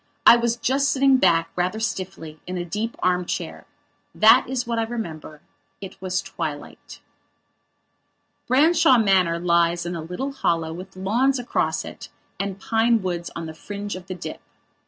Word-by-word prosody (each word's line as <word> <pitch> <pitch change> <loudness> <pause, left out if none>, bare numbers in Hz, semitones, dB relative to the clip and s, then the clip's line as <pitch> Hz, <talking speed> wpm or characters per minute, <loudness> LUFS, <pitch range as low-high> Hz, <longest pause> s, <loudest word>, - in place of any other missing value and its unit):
I - - +10
was 235 -1 0
just 275 +4 +1
sitting 275 -1 +4
back, 165 -7 +2
rather 180 +4 -1
stiffly, 185 -7 -5
in 180 0 -4
a 175 - -3
deep 215 +6 -3
arm 180 0 +2
chair. - - -5 0.5
That 215 +1 +6
is 260 -2 -2
what 235 -1 -2
I - - +1
remember. 165 -10 -6 0.4
It 195 -1 -10
was 185 0 -2
twilight. - - -7 1.5
Branshaw 275 0 +5
Manor 190 -6 +3
lies 170 0 +1
in 175 0 -3
a 165 - -4
little 180 - -4
hollow 165 -11 -1
with 185 +3 -10
lawns 235 +9 +1
across 245 -1 -1
it - - -10 0.3
and 195 -1 -3
pine 225 +1 +2
woods 175 -2 -3
on 165 - -5
the 160 - -7
fringe 205 +4 -6
of 185 0 -10
the 185 - -5
dip. 175 - -7
190 Hz, 160 wpm, -23 LUFS, 175-235 Hz, 1.5 s, I